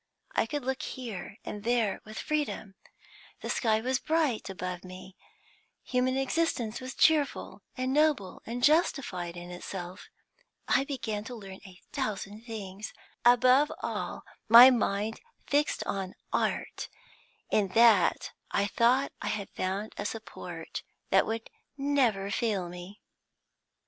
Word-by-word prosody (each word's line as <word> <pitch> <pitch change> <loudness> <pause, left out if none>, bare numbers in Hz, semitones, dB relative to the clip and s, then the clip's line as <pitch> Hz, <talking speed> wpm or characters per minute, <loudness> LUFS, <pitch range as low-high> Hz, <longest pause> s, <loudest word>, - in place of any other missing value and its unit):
I - - +1
could 285 +1 -3
look 265 0 -1
here 215 -7 -6
and 205 -1 -6
there 230 -3 +1
with 215 0 -9
freedom; 295 -9 -2 0.7
the - - -3
sky 220 -2 +2
was 260 +2 0
bright 310 -10 0
above 180 -1 -5
me; 185 +1 -10 0.7
human 255 +1 +1
existence 270 -5 0
was 255 +1 -6
cheerful 305 -3 +2 0.2
and 255 +1 0
noble 295 -10 +2
and 240 +2 -4
justified 245 - +2
in 175 0 -8
itself. 180 0 -7 0.6
I 270 - +3
began 225 -7 -3
to 245 - -6
learn 195 -3 -9
a 180 -1 -14
thousand 215 -5 -3
things. 210 -3 -6 0.3
Above 255 +4 +6
all, - - -3 0.3
my 240 +3 +11
mind 220 -2 0 0.2
fixed 290 +1 +1
on 190 -2 -3 0.2
Art; - - -1 0.6
in 205 -2 +3
that 225 -6 +5 0.2
I 200 - +1
thought 245 +6 +3
I - - -3
had 205 -2 -3
found 195 +3 -3
a 205 - -3
support 225 +1 -7 0.3
that - - +5
would 225 0 -3 0.3
never 255 -9 +1
fail 200 -6 0
me. 180 +4 -10
225 Hz, 130 wpm, -29 LUFS, 195-260 Hz, 0.7 s, my